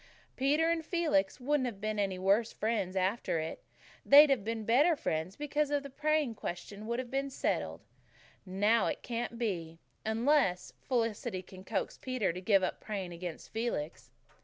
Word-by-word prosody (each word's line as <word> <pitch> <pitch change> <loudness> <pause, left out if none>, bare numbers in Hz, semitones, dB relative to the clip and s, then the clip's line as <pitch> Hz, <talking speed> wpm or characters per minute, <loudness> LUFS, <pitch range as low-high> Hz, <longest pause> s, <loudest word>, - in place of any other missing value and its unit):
Peter 290 +5 +2
and 330 -1 0
Felix 310 - +1
wouldn't 270 0 +1
have 215 -5 -6
been 215 0 -2
any 195 -2 0
worse 200 +5 +2
friends 205 -4 -1
after 190 0 0
it. 160 0 -4 0.4
They'd 290 +1 +8
have 250 -7 +2
been 225 0 -3
better 290 +10 +4
friends 160 - -2
because 295 0 -1
the 285 -1 -2
praying 305 -2 +1
question 205 +2 -6
would 235 +1 -1
have 255 -1 -5
been 275 +1 -1
settled. 265 - -2 0.6
And 190 0 -8
now 220 +3 +4
it - - -3
can't 235 -1 -3
be 170 -8 -3 0.3
unless 220 -4 +1
Felicity 230 -5 -1
can 185 +1 -12
coax 195 -1 -3
Peter 255 -9 -1
to 180 - -6
give 195 0 +3
up 185 - -2
praying 195 -5 -4
against 170 -1 -7
Felix." 150 - -3
225 Hz, 165 wpm, -32 LUFS, 190-270 Hz, 0.6 s, They'd